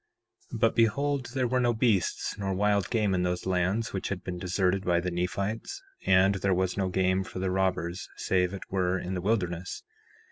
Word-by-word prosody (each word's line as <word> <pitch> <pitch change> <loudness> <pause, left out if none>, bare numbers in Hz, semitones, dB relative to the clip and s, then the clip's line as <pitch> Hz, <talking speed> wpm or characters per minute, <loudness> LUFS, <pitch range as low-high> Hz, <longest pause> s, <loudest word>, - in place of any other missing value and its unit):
4:2 115 - -5
But 115 -1 +3
behold, 135 +4 +2
there 130 -2 +1
were 125 +1 +1
no 120 -1 +2
wild 115 -2 -1
beasts 110 -8 +1
nor 100 +1 +1
game 105 -4 +1
in 90 - +1
those 90 0 -1
lands 95 +4 0
which 95 - -3
had 95 -2 -4
been 90 -1 -5
deserted 95 +1 0
by 85 -2 +2
the 90 +1 -2
Nephites, 100 - -3 0.2
and 95 +1 +5
there 95 -1 +2
was 95 0 0
no 95 -2 0
game 95 +1 +1
for 95 - -9
the 95 0 -1
robbers 90 -2 -1
save 90 -1 +1
it 100 - -6
were 95 -1 +1
in 90 +1 -4
the 90 - -2
wilderness. 90 -3 -1
95 Hz, 200 wpm, -28 LUFS, 90-105 Hz, 0.2 s, and